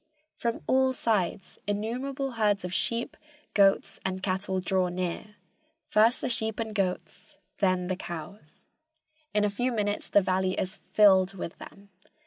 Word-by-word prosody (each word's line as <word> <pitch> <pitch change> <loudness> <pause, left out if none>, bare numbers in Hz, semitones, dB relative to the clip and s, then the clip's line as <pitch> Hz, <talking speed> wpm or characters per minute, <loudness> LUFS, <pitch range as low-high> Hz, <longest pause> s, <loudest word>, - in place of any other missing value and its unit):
From 235 -1 -2
all 260 0 +3
sides 205 -6 -1
innumerable 255 +6 -2
herds 210 -4 +1
of 180 - -5
sheep, 235 +4 0 0.4
goats 195 -1 +3
and 190 0 -3
cattle 190 0 -1
draw 185 0 +1
near, 185 +4 -4 0.5
first 225 +3 +3
the - - -1
sheep 220 -2 -1
and 220 -1 -3
goats, 190 -3 -3 0.2
then 185 -2 +2
the 185 +1 -1
cows. 170 -1 -9 0.7
In 210 0 +2
a - - +2
few 245 +5 -1
minutes 205 -3 -1
the 205 - +5
valley 185 0 +1
is 190 +2 -3
filled 195 -2 +5
with 175 -2 -6
them. 200 0 -13
200 Hz, 145 wpm, -28 LUFS, 185-220 Hz, 0.7 s, the